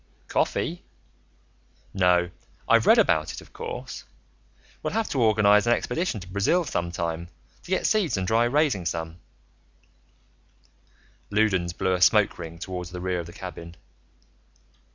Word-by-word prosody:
"Coffee? 175 +2 -1 1.1
No. 90 -2 +3 0.4
I've - - +4
read - - +7
about 75 -1 +2
it, - - -7
of - - -16
course. - - -7 0.8
We'll - - -3
have 225 0 0
to 135 - -1
organize 105 -1 +4
an 120 - +5
expedition 125 - -2
to 90 - -10
Brazil, 100 - +1
sometime, 85 - -3 0.3
to - - -15
get 190 - 0
seeds 205 - +2
and 95 -1 -2
try 115 +3 +3
raising 125 - +1
some." 80 0 -4 2.1
Loudons 95 -5 +1
blew 95 +2 0
a 90 - -1
smoke 105 +1 +4
ring 85 -1 -7
toward 90 0 -5
the 90 +1 -7
rear 90 0 -2
of 85 - -6
the - - -10
cabin. 85 -2 -9
95 Hz, 140 wpm, -25 LUFS, 85-115 Hz, 2.1 s, read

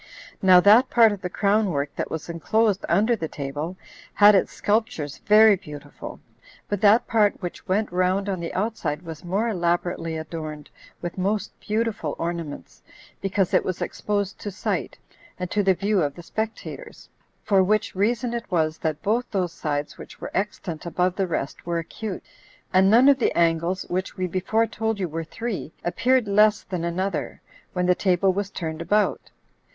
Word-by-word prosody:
Now 185 -2 +7
that 220 +8 +6
part 230 -2 +6
of 205 -2 -5
the 180 - -3
crown 205 +2 +2
work 140 -3 -2
that - - -3
was 160 - -5
enclosed 200 +5 +1
under 220 +4 +3
the 165 -7 -4
table 150 +5 -5 0.4
had 205 0 +8
its 195 - +2
sculptures 210 - -1
very 215 0 +6
beautiful; 150 -5 -10 0.5
but 205 -1 -2
that 215 +2 +5
part 215 -3 +2
which 175 +1 -7
went 205 +2 0
round 185 +2 +1
on 190 -3 -2
the 170 - -4
outside 190 -6 -2
was 160 -1 -8
more 195 +6 0
elaborately 175 -4 -1
adorned 155 -2 -7 0.3
with 175 +2 -4
most 200 +3 -1
beautiful 215 -8 -2
ornaments, 170 -3 -5 0.4
because 195 -1 0
it - - +4
was 185 -1 -3
exposed 205 -1 -2
to 205 - -5
sight, 195 - -3 0.4
and 180 -1 -5
to 205 - +2
the 190 -2 +3
view 200 +1 +1
of 145 -2 -1
the 175 - -10
spectators; 225 - -6 0.4
for 195 -2 +4
which 215 +3 +1
reason 230 +5 0
it 235 -1 -4
was 160 -4 0
that 155 -2 -3
both 230 +4 0
those 180 -4 -1
sides 145 -3 -3
which - - -11
were - - -6
extant 190 -5 -3
above 180 +1 0
the 195 -2 0
rest 140 -5 -3
were 170 -1 0
acute, 190 +4 -5 0.5
and 190 +1 +5
none 240 +5 +6
of 280 -1 +6
the - - +1
angles, 170 +2 +1
which 185 +1 -3
we 185 - -1
before 190 +6 +1
told 225 -1 -2
you 185 - -1
were 165 +1 -4
three, 220 +1 -5
appeared 250 +6 +2
less 210 +1 +4
than 180 -3 -4
another, 175 0 -2 0.3
when 180 -1 0
the 180 - +5
table 185 0 +2
was 200 +1 -2
turned 160 -4 -5
about. 210 +5 0
190 Hz, 175 wpm, -24 LUFS, 170-210 Hz, 0.5 s, had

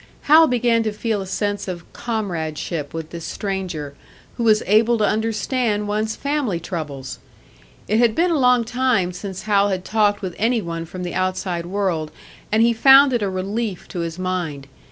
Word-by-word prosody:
Hal 315 +2 +7
began 240 -2 +2
to 220 -1 -1
feel 215 -1 -2
a 190 - -6
sense 205 +1 -2
of 175 -2 -6
comradeship 170 -8 -3
with 160 -1 -6
this 170 -1 -7
stranger, 185 -9 -4 0.4
who 235 - -3
was 215 -2 +4
able 225 +4 +4
to 215 - +2
understand 220 0 0
one's 215 +1 -1
family 280 - -1
troubles! 150 -7 -6 0.7
It 215 +2 +2
had 235 -2 +3
been 350 +4 +2
a 320 - +1
long 250 -2 +4
time 240 -6 +1
since 190 +1 -7
Hal 205 -1 +3
had 185 -2 -3
talked 210 -2 +1
with 185 -2 -3
any 230 +2 +2
one 165 -4 -5
from 180 +2 -7
the 175 - -4
outside 185 -2 -2
world, 180 -5 -1 0.4
and 220 +1 +4
he 235 0 +4
found 270 +3 +7
it 240 - +1
a 200 - 0
relief 195 +2 -3
to 180 - -5
his 165 0 -4
mind. 180 -7 -3
205 Hz, 180 wpm, -21 LUFS, 175-230 Hz, 0.7 s, Hal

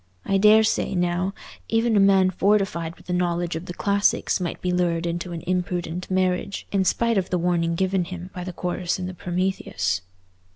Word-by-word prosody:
I 195 0 +2
daresay, 215 -1 +4
now, 180 +1 0 0.4
even 225 0 +2
a - - +5
man 195 -1 +5
fortified 185 -4 +1
with - - -20
a - - +1
knowledge 175 -1 0
of 165 +3 -6
the 175 - -5
classics 200 -1 +1
might 175 -2 -3
be 180 - -1
lured 175 -2 0
into 170 +1 -3
an 170 -1 -5
imprudent 180 -1 -2
marriage, 185 +1 0
in 195 -2 +1
spite 230 +3 +2
of 185 - -4
the 180 - +1
warning 170 -1 +1
given 190 0 +1
him 180 0 -8
by 180 - -5
the 185 - -5
chorus 180 0 -2
in 185 - -4
the 185 - -5
Prometheus." 175 - -1
180 Hz, 190 wpm, -24 LUFS, 175-190 Hz, 0.4 s, a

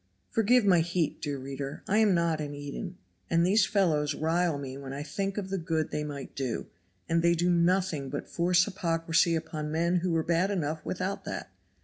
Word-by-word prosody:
Forgive 225 +1 +4
my 180 -4 +5
heat, 170 -1 -1
dear 145 -2 -2
reader. 135 +1 -6
I 210 +3 +3
am 210 -4 +4
not 165 -2 +1
an 145 -1 -4
Eden, 145 +6 -6 0.3
and 170 0 +3
these 200 +2 +4
fellows 155 -7 +2
rile 165 0 +1
me 135 -2 -6
when 135 -1 -7
I 140 +1 -4
think 195 +7 -3
of 190 -2 -4
the 195 - -1
good 160 -2 -1
they 150 - -2
might 145 -2 -6
do, 130 -5 -2 0.4
and 165 0 +2
they 170 0 +4
do 175 +2 +2
nothing 170 -4 +1
but 145 - -4
force 180 +1 +3
hypocrisy 165 -3 +1
upon 155 -1 -4
men 170 +3 +2
who 180 +1 0
were 165 -1 +1
bad 170 +4 +2
enough 160 -5 -2
without 190 +2 -3
that. - - -5
165 Hz, 200 wpm, -29 LUFS, 150-185 Hz, 0.4 s, my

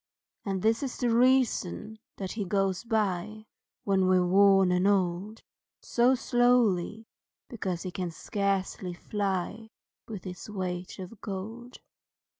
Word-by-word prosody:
And 195 -2 -2
this 225 +1 +2
is 270 -3 -4
the 245 -2 +1
reason 235 -4 +2 0.2
that 190 -2 -4
he 215 - -3
goes 195 0 0
by, 215 -2 -1 0.4
When 190 -2 +2
we're 185 -1 +4
worn 195 0 +5
and 180 +2 +2
old, 195 +2 0 0.4
So 245 +2 +3
slowly, 235 -5 +2 0.4
because 190 -8 -3
he 185 - -4
can 180 -1 -3
scarcely 190 0 -2
fly 205 +3 -3 0.4
With 210 -5 -7
his 180 +2 -8
weight 185 -3 -4
of 190 +2 -9
gold. 220 +6 -7
200 Hz, 125 wpm, -28 LUFS, 185-225 Hz, 0.4 s, worn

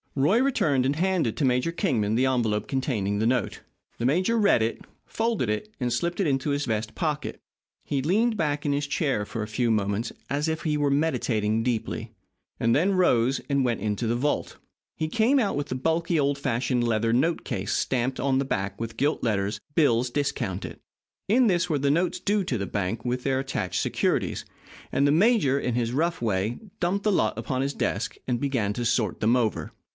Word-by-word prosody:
Roy 150 - +3
returned 155 - +2
and 140 +2 +1
handed 180 - +1
to 145 - +1
Major 125 +5 +1
Kingman 120 - 0
the 130 +3 +3
envelope 115 -5 0
containing 110 -7 -1
the 110 - +2
note. 125 -3 0 0.4
The 115 - -1
major 185 - +2
read 205 - +4
it, 115 +1 -1 0.2
folded 225 - -1
it, 105 - -3
and 125 -2 0
slipped 170 +8 -1
it 195 - +2
into 135 0 0
his 145 0 0
vest 110 -1 -2
pocket. 150 -3 -2 0.5
He 140 -2 -1
leaned 215 - +2
back 150 -5 -1
in 145 - +2
his 145 0 -1
chair 140 -7 0
for 110 - -5
a - - -5
few 115 +2 0
moments 105 +2 0 0.2
as 145 +3 0
if 160 0 -3
he 155 -2 0
were 145 -1 +1
meditating 115 -7 +1
deeply, 115 -1 -2 0.5
and 115 0 +3
then 185 +7 +3
rose 130 -8 +3
and 140 -2 +1
went 120 -3 0
into 105 +2 -2
the 115 +1 +1
vault. 145 +4 -1 0.4
He 155 - -1
came 230 - +3
out 210 -5 0
with 145 0 -2
the 130 - -3
bulky, 165 +4 0
old 140 0 +1
fashioned 125 -2 0
leather 115 -1 +1
note 160 +8 +1
case 100 -5 -3
stamped 130 0 0
on 135 -1 +1
the - - +1
back 100 -6 -2
in 115 - -1
gilt 145 +3 0
letters, 105 -2 -1
"Bills 125 -5 +3
Discounted." 120 -8 -3 0.5
In 245 +4 +5
this 180 -2 +1
were 150 -3 +1
the 140 +1 +2
notes 175 +4 +1
due 205 0 +1
the 120 - -2
bank 100 +4 -3
with 125 +1 -1
their 135 -1 +1
attached 105 -9 -2
securities, - - 0 0.5
and 140 +1 +2
the - - +4
major, 170 - +4
in 125 -3 -1
his 120 -1 -1
rough 165 +3 0
way, 105 0 -1 0.2
dumped 185 +3 0
the 215 - +2
lot - - +1
upon 130 -1 -2
his 140 +1 -1
desk - - -2
and 120 -2 -1
began 125 -8 0
to 120 - -3
sort 110 -4 0
them 115 +3 +4
over. 115 -4 -1
135 Hz, 200 wpm, -26 LUFS, 115-160 Hz, 0.5 s, In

